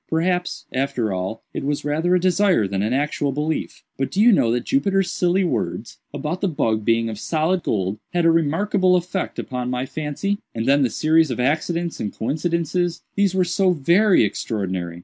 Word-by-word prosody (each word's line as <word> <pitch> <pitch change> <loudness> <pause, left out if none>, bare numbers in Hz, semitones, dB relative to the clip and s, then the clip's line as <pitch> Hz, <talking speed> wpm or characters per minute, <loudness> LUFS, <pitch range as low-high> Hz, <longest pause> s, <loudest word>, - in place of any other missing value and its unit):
Perhaps, 180 +2 -1
after 130 -6 -1
all, 95 +4 -4
it - - -4
was 145 +1 -2
rather 160 +5 +1
a - - +3
desire 185 - +2
than 95 0 -2
an 105 +3 -1
actual 145 +1 0
belief;—but 150 -2 -3
do 190 - -3
you 235 +3 +7
know 120 - +3
that 120 +1 0
Jupiter's 195 -8 +1
silly 180 +2 +1
words, 110 - -3
about 150 +5 -4
the 195 - +1
bug 110 - 0
being 115 +1 +2
of 110 -2 -5
solid 165 +6 0
gold, 100 - -2
had 175 -2 +1
a 165 - +6
remarkable 180 +4 +2
effect 180 +1 -2
upon 125 -1 -4
my 125 +1 -2
fancy? 155 +8 -3 0.2
And 115 0 -2
then 140 +1 +4
the 130 - +2
series 160 +2 +2
of 125 - -3
accidents 165 +5 -1
and 105 - -3
coincidences—these 170 - -1
were 185 - +3
so 185 +1 +2
very 175 - +4
extraordinary. 95 -5 -3
155 Hz, 180 wpm, -22 LUFS, 120-180 Hz, 0.2 s, you